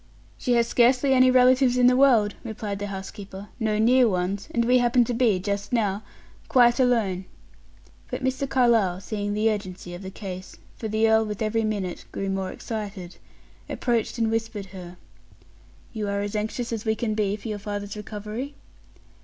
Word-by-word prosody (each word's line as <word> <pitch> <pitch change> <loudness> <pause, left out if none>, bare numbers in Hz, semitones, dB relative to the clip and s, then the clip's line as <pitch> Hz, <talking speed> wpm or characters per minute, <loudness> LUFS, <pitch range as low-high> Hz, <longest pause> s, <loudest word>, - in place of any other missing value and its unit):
"She 250 - -1
has 235 -1 +3
scarcely 250 +3 +3
any 255 0 +6
relatives 255 0 +5
in 250 - +4
the 250 0 +6
world," 240 -6 +4
replied 215 -3 -5
the 205 - -3
housekeeper; 195 0 -8
"no 215 -2 0
near 240 +2 +5
ones; 190 +2 -2
and 235 0 0
we 250 +1 +4
happen 245 0 +4
to 240 - -2
be, 230 -5 +3
just 200 +2 -3
now, 210 -4 0 0.5
quite 240 0 +5
alone." 220 -8 +1 0.8
But - - -4
Mr. 260 +1 -1
Carlyle, 230 -9 +3
seeing 205 0 -3
the 220 +1 +2
urgency 185 -4 -6
of 175 - -8
the 190 - -6
case, 185 -1 -8 0.2
for 220 - -5
the 220 +1 +2
earl, 220 0 +4
with 210 0 -4
every 225 +1 0
minute, 200 -5 -3
grew 195 0 -3
more 190 -1 -2
excited, 200 -5 -6 0.5
approached 240 -1 -1
and 225 -1 +1
whispered 225 -3 -2
her: 180 -1 -9 1.0
"You 215 -3 -3
are 200 0 -1
as 205 +1 -4
anxious 225 +3 -2
as 220 -2 -3
we 220 -1 +1
can 220 -1 -2
be 205 -2 0
for 215 +2 -7
your 210 -1 -3
father's 205 0 -5
recovery?" 215 +6 -6
215 Hz, 180 wpm, -25 LUFS, 200-240 Hz, 1.0 s, any